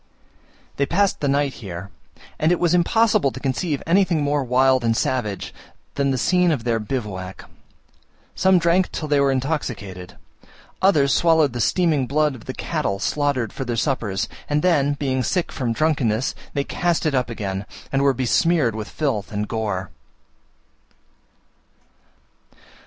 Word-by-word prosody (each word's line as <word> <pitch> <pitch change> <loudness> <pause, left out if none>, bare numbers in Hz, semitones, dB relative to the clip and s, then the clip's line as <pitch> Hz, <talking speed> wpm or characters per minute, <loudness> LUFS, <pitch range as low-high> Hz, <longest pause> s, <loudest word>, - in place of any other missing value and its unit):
They 140 - +1
passed 195 +4 +1
the 145 - -1
night 140 0 +1
here; 95 -1 -7 0.5
and 155 +2 +3
it 175 - +2
was 175 -1 +2
impossible 180 -3 +3
to 130 - -8
conceive 140 +3 -2
anything 175 -3 +2
more 145 0 +1
wild 130 0 +3
and 115 -1 +1
savage 105 -8 -2 0.4
than 140 -1 0
the 135 - 0
scene 180 +6 +3
of 135 -7 -1
their 115 -1 0
bivouac. 105 -5 -5 0.9
Some 190 0 +4
drank 175 +2 +2
till 155 - -4
they 145 -1 +2
were 140 -1 +3
intoxicated; 125 - -3 0.7
others 150 -8 +4
swallowed 160 -5 +3
the 120 - -2
steaming 155 - +2
blood 150 +1 +1
of 125 - -12
the - - -5
cattle 100 - -2
slaughtered 135 0 -1
for 135 - -4
their 120 -2 -3
suppers, 110 -6 -1 0.2
and 150 0 +1
then, 145 -6 +3
being 135 -2 -1
sick 175 +8 -1
from 125 -4 -2
drunkenness, 130 -4 +1 0.2
they 140 - +1
cast 175 +3 -1
it 155 - +1
up 125 -3 0
again, 100 -3 -4 0.2
and 135 - +1
were 140 0 +4
besmeared 130 +1 +2
with 110 0 -6
filth 135 -10 -2
and 105 0 -2
gore. 105 -5 -3
135 Hz, 150 wpm, -22 LUFS, 115-155 Hz, 0.9 s, Some